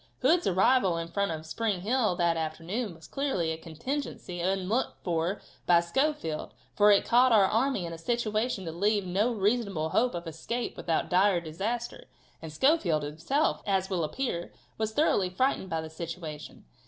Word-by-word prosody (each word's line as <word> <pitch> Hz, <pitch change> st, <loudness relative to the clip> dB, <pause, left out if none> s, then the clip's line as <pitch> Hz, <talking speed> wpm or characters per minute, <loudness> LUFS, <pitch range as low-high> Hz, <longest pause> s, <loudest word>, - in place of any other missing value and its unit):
Hood's 345 Hz, +1 st, +4 dB
arrival 190 Hz, -1 st, +3 dB
in 165 Hz, 0 st, -4 dB
front 200 Hz, +2 st, 0 dB
of 160 Hz, -1 st, -5 dB
Spring 200 Hz, +2 st, -2 dB
Hill 220 Hz, -2 st, +1 dB
that 170 Hz, -1 st, +2 dB
afternoon 165 Hz, +6 st, -3 dB
was 160 Hz, -1 st, -14 dB
clearly 230 Hz, -, -1 dB
a 160 Hz, -, -3 dB
contingency 175 Hz, -, -5 dB
unlooked 190 Hz, +6 st, 0 dB
for 175 Hz, +3 st, -1 dB, 0.3 s
by 175 Hz, -1 st, +6 dB
Schofield, 170 Hz, -, -1 dB, 0.2 s
for 210 Hz, 0 st, +6 dB
it 200 Hz, -1 st, +5 dB
caught 250 Hz, +2 st, +5 dB
our 210 Hz, -4 st, +6 dB
army 225 Hz, -1 st, +1 dB
in 165 Hz, -, -5 dB
a 165 Hz, -, -8 dB
situation 220 Hz, 0 st, -1 dB
to 165 Hz, -, -4 dB
leave 200 Hz, +4 st, +1 dB
no 200 Hz, +7 st, +1 dB
reasonable 200 Hz, -6 st, 0 dB
hope 240 Hz, +4 st, +1 dB
of 170 Hz, 0 st, -5 dB
escape 195 Hz, +9 st, -4 dB
without 165 Hz, -2 st, -1 dB
dire 185 Hz, 0 st, +4 dB
disaster, 200 Hz, +9 st, -4 dB, 0.4 s
and 160 Hz, -, -7 dB
Schofield 175 Hz, -, +2 dB
himself, 165 Hz, -, 0 dB
as 190 Hz, -1 st, 0 dB
will 175 Hz, -3 st, 0 dB
appear, 175 Hz, -, -3 dB, 0.2 s
was 220 Hz, 0 st, -2 dB
thoroughly 220 Hz, -, +2 dB
frightened 190 Hz, 0 st, 0 dB
by 165 Hz, -1 st, -1 dB
the 160 Hz, -, -7 dB
situation. 160 Hz, -, -7 dB
190 Hz, 165 wpm, -29 LUFS, 165-235 Hz, 0.4 s, by